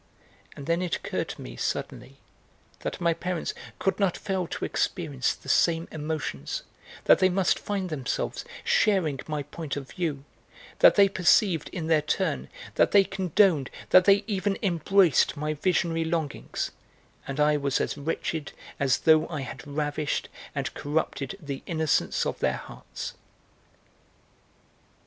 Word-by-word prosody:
And 140 Hz, -, -8 dB
then 170 Hz, +3 st, +1 dB
it 180 Hz, -2 st, 0 dB
occurred -, -, -3 dB
to -, -, -7 dB
me -, -, -8 dB
suddenly 65 Hz, +2 st, -4 dB, 0.6 s
that -, -, -4 dB
my 170 Hz, -1 st, +2 dB
parents 180 Hz, 0 st, -3 dB, 0.2 s
could 195 Hz, -, 0 dB
not 195 Hz, -4 st, +2 dB
fail 190 Hz, -3 st, -2 dB
to -, -, -4 dB
experience 145 Hz, -7 st, -1 dB
the -, -, -17 dB
same 165 Hz, 0 st, +3 dB
emotions, 150 Hz, -, -4 dB, 0.4 s
that -, -, +6 dB
they 185 Hz, -, +5 dB
must 185 Hz, 0 st, +2 dB
find 195 Hz, -4 st, -3 dB
themselves 135 Hz, -5 st, -2 dB, 0.2 s
sharing 175 Hz, -10 st, +2 dB
my 150 Hz, -2 st, -2 dB
point 145 Hz, +1 st, -6 dB
of 135 Hz, -2 st, -7 dB
view, 155 Hz, -6 st, -2 dB, 0.6 s
that -, -, +7 dB
they 200 Hz, -1 st, +7 dB
perceived 185 Hz, -3 st, +3 dB
in 170 Hz, -3 st, -4 dB
their 160 Hz, -1 st, +3 dB
turn, 70 Hz, -, -1 dB, 0.2 s
that -, -, +4 dB
they 200 Hz, -1 st, +8 dB
condoned, 185 Hz, -6 st, +2 dB, 0.2 s
that 185 Hz, 0 st, +7 dB
they 200 Hz, 0 st, +5 dB
even 200 Hz, -2 st, -1 dB
embraced 175 Hz, -, +3 dB
my 150 Hz, +1 st, -1 dB
visionary 165 Hz, 0 st, +1 dB
longings, 160 Hz, -3 st, -2 dB, 0.6 s
and 140 Hz, +2 st, -4 dB
I 150 Hz, 0 st, +4 dB
was 140 Hz, -2 st, 0 dB
as -, -, -1 dB
wretched 155 Hz, +1 st, -3 dB, 0.3 s
as 135 Hz, -4 st, +2 dB
though 155 Hz, -1 st, +5 dB
I 155 Hz, -4 st, -4 dB
had 135 Hz, +1 st, -8 dB
ravished 145 Hz, 0 st, -2 dB, 0.3 s
and -, -, -2 dB
corrupted 150 Hz, +3 st, -2 dB
the 140 Hz, -5 st, -6 dB
innocence 160 Hz, -3 st, +1 dB
of -, -, -3 dB
their -, -, +1 dB
hearts. -, -, -8 dB
160 Hz, 145 wpm, -27 LUFS, 145-185 Hz, 0.6 s, they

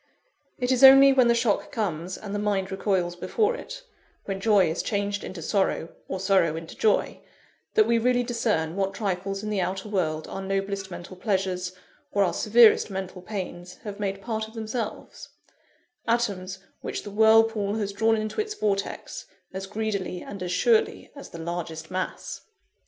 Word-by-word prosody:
It 250 Hz, 0 st, 0 dB
is 260 Hz, 0 st, +2 dB
only 270 Hz, +1 st, +10 dB
when 255 Hz, -2 st, +5 dB
the 235 Hz, -, +4 dB
shock 230 Hz, -3 st, 0 dB
comes, 185 Hz, -5 st, -3 dB
and 205 Hz, -2 st, -7 dB
the 205 Hz, -, -1 dB
mind 200 Hz, -2 st, -1 dB
recoils 190 Hz, -3 st, 0 dB
before 420 Hz, -, 0 dB
it -, -, -8 dB, 0.4 s
when 195 Hz, -1 st, -3 dB
joy 205 Hz, -4 st, +4 dB
is 160 Hz, +2 st, -1 dB
changed 205 Hz, -1 st, -2 dB
into 175 Hz, -3 st, -7 dB
sorrow, 190 Hz, -3 st, 0 dB, 0.2 s
or 190 Hz, -, -4 dB
sorrow 190 Hz, -4 st, +3 dB
into 165 Hz, 0 st, -8 dB
joy 215 Hz, -, +1 dB, 0.5 s
that 435 Hz, -, +6 dB
we 235 Hz, -, +3 dB
really 245 Hz, +1 st, +2 dB
discern 220 Hz, -9 st, -1 dB
what 195 Hz, 0 st, -1 dB
trifles 195 Hz, -1 st, -2 dB
in 215 Hz, -, -3 dB
the 200 Hz, -3 st, 0 dB
outer 190 Hz, +3 st, -3 dB
world 160 Hz, -6 st, -1 dB
our 195 Hz, -, -5 dB
noblest 195 Hz, 0 st, -2 dB
mental 175 Hz, +1 st, -8 dB
pleasures, 185 Hz, -2 st, -1 dB, 0.4 s
or 200 Hz, -, +4 dB
our 180 Hz, -, +1 dB
severest 225 Hz, 0 st, +5 dB
mental 190 Hz, -1 st, -5 dB
pains, 180 Hz, -2 st, -6 dB
have 205 Hz, -1 st, -7 dB
made 195 Hz, -1 st, -3 dB
part 220 Hz, -2 st, -2 dB
of 220 Hz, -, -16 dB
themselves; 220 Hz, 0 st, -5 dB, 0.8 s
atoms 200 Hz, -5 st, 0 dB, 0.2 s
which -, -, -4 dB
the 205 Hz, -, -8 dB
whirlpool 220 Hz, -1 st, +4 dB
has 205 Hz, -2 st, -2 dB
drawn 225 Hz, +2 st, +3 dB
into 215 Hz, -, -2 dB
its 425 Hz, 0 st, -5 dB
vortex, 200 Hz, -, -3 dB, 0.3 s
as 190 Hz, +1 st, -5 dB
greedily 200 Hz, -4 st, -3 dB
and 200 Hz, -2 st, -8 dB
as 180 Hz, -1 st, -3 dB
surely 225 Hz, +4 st, +2 dB
as 280 Hz, -, -10 dB
the -, -, -9 dB
largest 165 Hz, -1 st, -5 dB
mass. 185 Hz, 0 st, -4 dB
200 Hz, 170 wpm, -26 LUFS, 185-220 Hz, 0.8 s, only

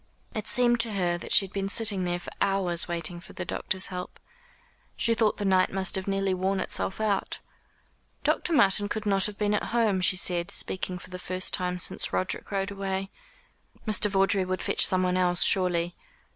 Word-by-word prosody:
It 215 Hz, -, -5 dB
seemed 240 Hz, -1 st, +4 dB
to 225 Hz, -1 st, +3 dB
her 175 Hz, -3 st, 0 dB
that -, -, -9 dB
she 195 Hz, -, +6 dB
had 190 Hz, -, -14 dB
been 195 Hz, -1 st, -2 dB
sitting 205 Hz, -3 st, +2 dB
there 175 Hz, 0 st, -1 dB
for -, -, -10 dB
hours 190 Hz, -4 st, +2 dB
waiting 170 Hz, 0 st, -2 dB
for 175 Hz, -, -13 dB
the -, -, -6 dB
doctor's 190 Hz, -2 st, -1 dB
help. 180 Hz, 0 st, -7 dB, 0.8 s
She 230 Hz, -, +2 dB
thought 220 Hz, -2 st, +1 dB
the 205 Hz, -, -3 dB
night 185 Hz, -1 st, +3 dB
must 190 Hz, -1 st, +1 dB
have 190 Hz, 0 st, -2 dB
nearly 195 Hz, -1 st, 0 dB
worn 190 Hz, +1 st, -1 dB
itself 190 Hz, +1 st, -2 dB
out. 210 Hz, -3 st, -1 dB, 0.9 s
"Dr. -, -, 0 dB
Martin 205 Hz, -, +3 dB
could 220 Hz, 0 st, -4 dB
not 195 Hz, -1 st, +3 dB
have 210 Hz, -1 st, -9 dB
been 210 Hz, 0 st, 0 dB
at 210 Hz, -, 0 dB
home," 215 Hz, -5 st, +2 dB
she 185 Hz, 0 st, +1 dB
said, 175 Hz, -2 st, 0 dB
speaking 185 Hz, -1 st, -3 dB
for 180 Hz, -, -12 dB
the 180 Hz, -, -6 dB
first 185 Hz, 0 st, -2 dB
time 180 Hz, 0 st, -1 dB
since 180 Hz, -, -4 dB
Roderick 185 Hz, -, -2 dB
rode 195 Hz, 0 st, -2 dB
away. 195 Hz, -1 st, -4 dB, 0.8 s
"Mr. 210 Hz, -1 st, +2 dB
Vawdrey 195 Hz, 0 st, +2 dB
would 185 Hz, 0 st, -3 dB
fetch -, -, +2 dB
someone 185 Hz, -1 st, +3 dB
else, 180 Hz, -1 st, +2 dB
surely." 175 Hz, -2 st, +2 dB
190 Hz, 195 wpm, -27 LUFS, 180-205 Hz, 0.9 s, she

